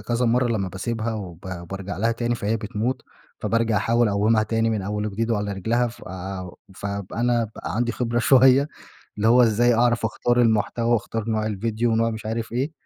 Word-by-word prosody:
كذا 120 +1 -1
مرّة 125 +2 +3
لمّا 100 -5 -1
باسيبها 115 +5 -3
وب 90 -5 -7 0.3
بارجع 95 0 -5
لها 115 +4 +1
تاني 120 +1 -1
فهي 110 0 -1
بتموت، 110 +4 -3 0.4
فبارجع 115 -1 +1
أحاول 115 +2 +2
أقومها 105 +2 +2
تاني 115 +1 0
من 110 -3 -1
أوّل 105 +2 -2
وجديد 110 +3 -2
وعلى 105 -2 -1
رجلها 115 +6 0
فآآ 95 -4 -7
و 90 - -10 0.2
فأب 100 -1 -5
أنا 120 0 +1
بقى - - -5
عندي 120 0 0
خبرة 120 +1 -1
شويّة 130 +3 +5 0.5
اللي 105 - +1
هو 125 +2 +6
إزاي 120 +2 +3
أعرف 120 -1 +2
أختار 120 +2 +1
المحتوى 115 +1 +1
وأختار 115 0 -2
نوع 110 0 0
الڤيديو 110 +2 -3
ونوع 115 -1 +2
مش 110 -1 -6
عارف 115 +1 -3
إيه، 130 +6 -1
115 Hz, 185 wpm, -23 LUFS, 105-120 Hz, 0.5 s, هو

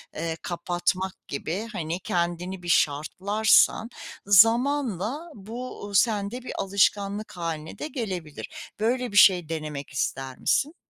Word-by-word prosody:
eee, 165 0 -3
kapatmak 180 +2 -2
gibi, 175 +10 -4
hani, 170 -2 -3
kendini 175 +1 -2
bir 175 - -5
şartlarsan 200 +9 +3 0.4
zamanla 235 - +3
bu 220 +1 -7
sende 210 +3 +1
bir - - -6
alışkanlık 200 +1 +1
hâline 160 -2 -5
de - - -3
gelebilir. 185 - -6
Böyle 245 +2 0
bir 205 - -1
şey 180 -6 +6
denemek 150 -3 -5
ister 135 -1 -3
misin? 300 +4 +1
190 Hz, 115 wpm, -26 LUFS, 170-220 Hz, 0.4 s, şey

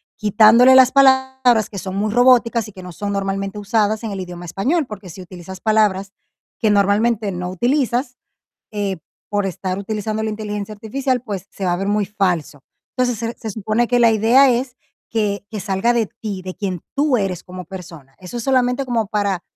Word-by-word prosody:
quitándole 220 +4 +6
las 260 -1 +7
palabras 265 -4 +3
que 200 - -8
son 190 0 -5
muy 210 +1 -1
robóticas 240 -2 +4
y - - -11
que 190 -1 -12
no 180 0 -9
son 200 +3 -4
normalmente 195 +1 -3
usadas 215 +1 0
en 220 - -3
el 195 - -5
idioma 175 -1 -7
español, 260 - -1
porque 195 -4 -9
si 185 +3 -10
utilizas 180 +1 -10
palabras 205 -3 +1 0.5
que 215 -4 +2
normalmente 205 +1 +2
no 180 0 -4
utilizas, 250 - 0 0.6
eh, 200 -4 -2 0.3
por 205 -1 0
estar 185 +1 -3
utilizando 215 +1 -3
la 220 - -1
inteligencia 210 -1 -5
artificial, 250 +4 -2
pues 200 -5 -6
se 195 - -6
va 175 - +1
a - - 0
ver 195 +2 -3
muy 205 0 +1
falso. 180 -8 -2 0.4
Entonces, 245 -3 0
se 230 +1 -3
se 220 - -5
supone 220 +3 0
que 245 0 +2
la 230 -1 +6
idea 235 +5 +5
es 250 +1 -1 0.3
que 205 -3 -1
que 210 -3 -5
salga 205 +4 0
de 225 -3 +1
ti, 200 -4 -5
de 185 0 -6
quien 185 -5 -4
tú 285 -2 +2
eres 190 -4 -2
como 180 -1 -9
persona. 165 -7 -11
Eso 185 +6 -9
es 235 - -3
solamente 255 +1 +1
como 230 -4 -1
para 200 -3 -1
210 Hz, 195 wpm, -19 LUFS, 195-240 Hz, 0.6 s, las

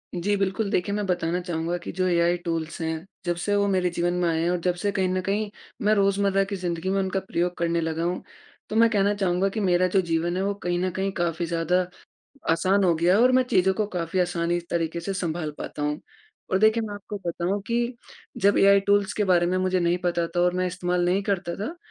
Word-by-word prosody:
जी 195 +4 0
बिल्कुल 200 +2 -1
देखिए 200 +3 0
मैं 210 -1 -1
बताना 175 -1 0
चाहूँगा 170 -1 -2
कि - - -5
जो 185 0 +2
एआई 175 0 +2
टूल्स 165 -1 -3
हैं, 160 +1 -3 0.2
जब 175 0 0
से 205 +4 -1
वो 200 0 +2
मेरे 185 -2 +1
जीवन 175 0 -1
में 180 -1 0
आए 160 0 0
हैं 170 - +1
और 180 - +1
जब 180 0 +1
से 200 +3 -1
कहीं 190 -1 0
न 185 0 0
कहीं, 205 +3 -1 0.3
मैं 210 +1 +3
रोज़मर्रा 200 -1 +2
की 200 +1 -4
ज़िंदगी 175 -1 -3
में 195 +1 +1
उनका 190 0 0
प्रयोग 180 -2 -2
करने 170 0 0
लगा 165 0 -2
हूँ। 175 +1 -2 0.5
तो - - -4
मैं 230 +1 +5
कहना 205 -2 +2
चाहूँगा 190 -1 +1
कि 220 - -4
मेरा 185 -2 +3
जो 190 - +6
जीवन 170 0 -1
है 190 - 0
वो 200 - 0
कहीं 175 0 0
न 185 +1 0
कहीं 190 +2 -2
काफ़ी 170 -2 -1
ज़्यादा, 170 +2 0 0.6
आसान 185 +4 +2
हो 175 -2 +4
गया 175 +4 +3
और 250 +1 +5
मैं 255 0 +4
चीज़ों 190 0 +3
को 215 +2 0
काफ़ी 170 +1 -1
आसानी 175 -1 0
तरीके 170 0 -1
से 195 +4 -4
संभाल 170 -4 -2
पाता - - -6
हूँ। 150 +1 -1 0.5
और 190 - +4
देखिए 220 +2 +4
मैं 210 -2 -5
आपको 205 +1 -7
बताऊँ 175 +4 -1
कि 240 +1 0 0.5
जब 200 +1 +4
एआई 200 0 +6
टूल्स 200 0 +2
के 210 - 0
बारे 180 -3 +3
में 180 +1 0
मुझे 185 0 +1
नहीं 175 0 +2
पता 175 -1 0
था - - +2
और 180 0 +3
मैं 185 0 0
इस्तेमाल 180 0 -1
नहीं 185 +3 +1
करता 190 -3 -2
था, 225 - -5
180 Hz, 235 wpm, -25 LUFS, 170-195 Hz, 0.6 s, जो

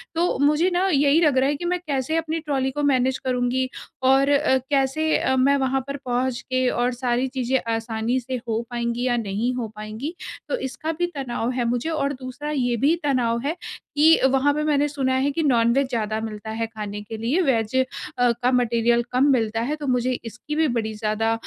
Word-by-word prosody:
तो 345 +2 +1
मुझे 300 +5 +3
ना, 370 +2 +2
यही 285 +3 +4
लग 290 -5 +3
रहा 270 +2 +3
है 290 - 0
कि 345 - -6
मैं 360 - -1
कैसे 275 +2 -1
अपनी 325 0 -1
ट्रॉली 270 -4 -1
को 295 +2 -3
मैनेज 255 +1 +1
करुँगी 255 0 0 0.4
और 275 +1 +4
अ, 285 -2 +3
कैसे 290 +3 +1
अ, 265 - +1
मैं 275 +2 +4
वहाँ 265 0 0
पर 280 - -4
पहुँच 245 0 -1
के 255 -1 0
और 245 +1 0
सारी 245 +1 0
चीज़ें 260 0 0 0.2
आसानी 225 +2 -1
से 255 +1 -5
हो 225 0 0
पाएँगी 240 +1 -2
या 240 -1 +1
नहीं 225 +3 -1
हो 235 -3 -3
पाएँगी? 215 +10 -6 0.3
तो - - 0
इसका 315 +5 -4
भी 350 - +2
तनाव 245 -3 -2
है 245 -2 -1
मुझे 245 +6 -1
और 285 -3 -1
दूसरा 255 0 -9
ये 245 -5 0
भी 295 +8 +3
तनाव 245 -5 +1
है 310 +4 -1 0.4
कि 315 +3 +6
वहाँ 270 +2 +3
पे 300 +1 -1
मैंने 295 -1 +2
सुना 270 -3 -1
है 270 +2 +2
कि 320 +3 -1
नॉनवेज 250 0 +3
ज़्यादा 220 -3 -1
मिलता 220 -1 -6
है 225 +1 -2
खाने 210 -2 -6
के 220 +2 -7
लिए, 245 +11 +1
वेज 230 -7 +1
अ, 260 - +4 0.5
का 245 +2 0
मटीरियल 235 -1 +2
कम 260 +3 +3
मिलता 225 -2 +1
है। 285 +6 -1
तो 295 -2 -6
मुझे 250 0 +1
इसकी 245 +6 -6
भी 315 -1 +3
बड़ी 220 -1 -2
ज़्यादा 215 +1 -1
255 Hz, 205 wpm, -23 LUFS, 235-285 Hz, 0.5 s, कि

